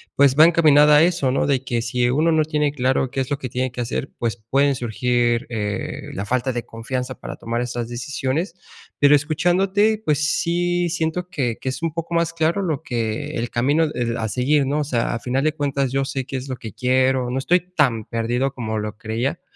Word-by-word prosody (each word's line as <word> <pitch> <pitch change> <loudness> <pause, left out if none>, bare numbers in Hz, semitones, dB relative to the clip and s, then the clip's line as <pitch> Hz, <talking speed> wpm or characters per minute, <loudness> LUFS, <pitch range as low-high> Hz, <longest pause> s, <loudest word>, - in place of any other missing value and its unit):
pues 140 -1 +4
va 155 - +10
encaminada 150 -3 +6
a 155 - +6
eso, 165 -7 +1
¿no?, 135 - +1
de 135 -2 0
que 120 -2 -1
si 120 +1 0
uno 155 +6 +2
no 160 -1 +3
tiene 150 -2 0
claro 130 -1 0
qué 135 - -3
es 130 0 -2
lo 145 - -1
que 130 -4 -6
tiene 130 0 -2
que 125 - -5
hacer, 120 +3 -3
pues 115 0 -2
pueden 135 +6 +1
surgir, 120 0 0
eh, 105 -3 -4
la 100 - -4
falta 130 +3 0
de 120 -1 -4
confianza 125 +3 -5
para - - -7
tomar 115 +1 -3
esas 120 -1 -4
decisiones. 135 +7 -3 0.4
Pero 145 0 +5
escuchándote, 190 +8 +2
pues, 150 0 +1
sí 175 +1 0
siento 165 +1 -2
que 130 -10 -2
que - - -8
es 130 - -5
un 165 - 0
poco 165 +1 -5
más 170 -1 +1
claro 165 +4 +1
lo 160 -6 -2
que 120 0 -3
el 115 0 -2
camino, 145 +7 +2
eh, 120 -1 -1
a 110 -1 -2
seguir, 135 +6 +2
¿no?, 145 +3 0
o 150 - +1
sea, 120 -5 -1
a - - -3
final 130 +3 -1
de 155 0 +2
cuentas, 140 -3 -1
yo 135 0 0
sé 135 -1 -3
qué 135 - -4
es 130 +2 -6
lo 130 - -3
que 110 -3 -8
quiero, 130 0 +1
no 125 - -2
estoy 175 +7 +3
tan 150 - 0
perdido 120 +4 -1
como 110 -3 -3
lo 105 0 -4
creía, 120 +9 -3
135 Hz, 220 wpm, -21 LUFS, 120-155 Hz, 0.4 s, va